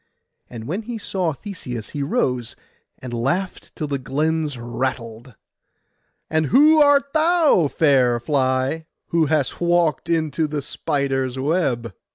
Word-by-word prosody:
And 115 -2 -8
when 185 +8 -2
he 235 +1 -6
saw 185 -5 -2
Theseus 135 - -7
he 145 - -5
rose, 130 - -1 0.4
and 125 -2 -8
laughed 140 +11 -2
till 155 - -3
the 140 -2 -2
glens 150 +2 -1
rattled. 120 -1 -4 0.9
'And 160 -1 0
who 305 - +6
art 280 -1 +4
thou, 315 - +4
fair 130 -6 +3
fly, 130 +4 0 0.2
who 165 -2 +2
hast 150 -1 -1
walked 170 -4 +1
into 160 -1 0
the 150 -1 -4
spider's 135 -2 -2
web? 130 - -1
150 Hz, 130 wpm, -21 LUFS, 130-175 Hz, 0.9 s, who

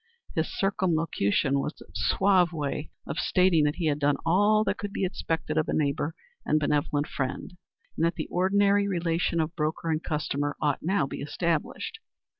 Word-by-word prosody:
His 160 0 -1
circumlocution 160 - +1
was 150 - -4
a - - -15
suave 180 - +3
way 150 -1 -3 0.2
of - - -4
stating 180 -4 +3
that 150 - +1
he 175 - -2
had 150 -1 +1
done 145 -1 +2
all 205 +5 +4
that - - -1
could 205 -1 -4
be 195 - -1
expected 160 -3 -2
of 155 - 0
a - - 0
neighbor 145 +1 0 0.3
and 155 - +2
benevolent 145 0 +1
friend, 150 +5 -4 0.4
and - - -1
that 170 0 +2
the - - -3
ordinary 200 +2 +3
relation 170 -2 0
of 160 +1 -1
broker 160 +1 -1
and 155 0 0
customer 145 -2 -2
ought 145 -2 0
now 180 -2 +1
be 135 - -6
established. 160 +2 -2
160 Hz, 175 wpm, -27 LUFS, 145-180 Hz, 0.4 s, all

